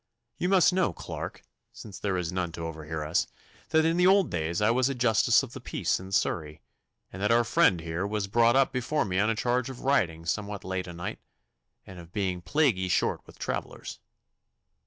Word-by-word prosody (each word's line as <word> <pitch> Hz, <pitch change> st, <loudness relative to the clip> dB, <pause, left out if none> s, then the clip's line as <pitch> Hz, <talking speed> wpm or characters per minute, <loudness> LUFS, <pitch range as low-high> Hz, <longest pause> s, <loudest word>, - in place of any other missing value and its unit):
You 180 Hz, -, 0 dB
must 190 Hz, -1 st, +5 dB
know, 185 Hz, -, +1 dB
Clarke, -, -, -7 dB, 0.3 s
since 100 Hz, -3 st, -10 dB
there 100 Hz, -3 st, -1 dB
is 85 Hz, -2 st, -2 dB
none 90 Hz, -2 st, -2 dB
to 85 Hz, 0 st, -5 dB
overhear 80 Hz, -1 st, -5 dB
us, 85 Hz, +6 st, 0 dB, 0.4 s
that 160 Hz, 0 st, +3 dB
in 165 Hz, +1 st, +2 dB
the 180 Hz, +1 st, +5 dB
old 195 Hz, -2 st, +4 dB
days 85 Hz, 0 st, -1 dB
I 105 Hz, +2 st, +3 dB
was 130 Hz, +2 st, +2 dB
a 135 Hz, -, -2 dB
Justice 115 Hz, -3 st, +3 dB
of -, -, -8 dB
the -, -, -8 dB
Peace -, -, -1 dB
in 95 Hz, +1 st, -10 dB
Surrey, 75 Hz, -5 st, -1 dB, 0.5 s
and 95 Hz, -, -7 dB
that 105 Hz, -, +1 dB
our 120 Hz, +1 st, +4 dB
friend 95 Hz, -6 st, +3 dB
here 85 Hz, +4 st, -3 dB
was 105 Hz, -1 st, -2 dB
brought 115 Hz, +4 st, +3 dB
up 135 Hz, 0 st, +4 dB
before 130 Hz, +4 st, -1 dB
me 95 Hz, -1 st, -1 dB
on 110 Hz, +2 st, +2 dB
a 115 Hz, -, +1 dB
charge 125 Hz, +2 st, 0 dB
of 130 Hz, -, -8 dB
riding 85 Hz, -12 st, +1 dB
somewhat 100 Hz, +4 st, -3 dB
late 95 Hz, 0 st, -3 dB
o' -, -, -6 dB
night, 85 Hz, +1 st, -6 dB, 0.7 s
and 95 Hz, -2 st, -11 dB
of 85 Hz, -1 st, -13 dB
being 95 Hz, -4 st, -1 dB
plaguey 120 Hz, -, +1 dB
short 90 Hz, -, +1 dB
with -, -, -15 dB
travellers. -, -, -5 dB
100 Hz, 205 wpm, -28 LUFS, 85-125 Hz, 0.7 s, must